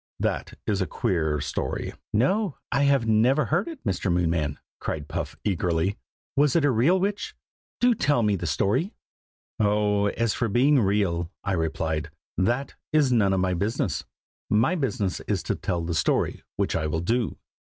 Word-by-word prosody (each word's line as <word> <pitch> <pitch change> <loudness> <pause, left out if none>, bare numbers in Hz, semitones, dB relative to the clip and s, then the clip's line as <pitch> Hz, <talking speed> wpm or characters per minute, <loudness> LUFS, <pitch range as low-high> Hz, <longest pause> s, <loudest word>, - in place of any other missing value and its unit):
That - - -2
is 100 -2 0
a 95 - 0
queer 80 -9 0
story." 75 -1 -3 0.2
"No, 180 - +1
I 140 +1 +3
have 140 -4 +3
never 120 +6 +3
heard 175 - 0
it, 325 -5 -8
Mr. 95 - 0
Moonman!" 80 -4 0 0.2
cried 75 -1 -4
Puff - - -4
eagerly. 90 +1 0 0.4
"Was 145 -1 +3
it 165 -3 +4
a 145 - +4
real 135 +11 +3
witch? 200 +3 -2 0.4
do 245 0 +5
tell 145 - +2
me 105 -1 +3
the 85 -2 -3
story!" 115 - 0 0.6
"Oh! 105 -1 +2
as 115 +1 0
for 120 - 0
being 135 +6 +4
real," 95 -5 +1
I 100 - -1
replied, 80 -2 -1 0.3
"that 120 +10 0 0.2
is 150 -4 +3
none 105 -5 +3
of 95 -1 +2
my 90 0 +1
business. 95 -4 -1 0.5
My 115 +11 +3
business 125 - -1
is - - 0
to - - 0
tell 85 -1 -2
the 85 +1 -2
story 80 - +1
which - - 0
I 75 - 0
will 80 +1 -1
do. 115 +6 0
105 Hz, 170 wpm, -26 LUFS, 85-135 Hz, 0.6 s, do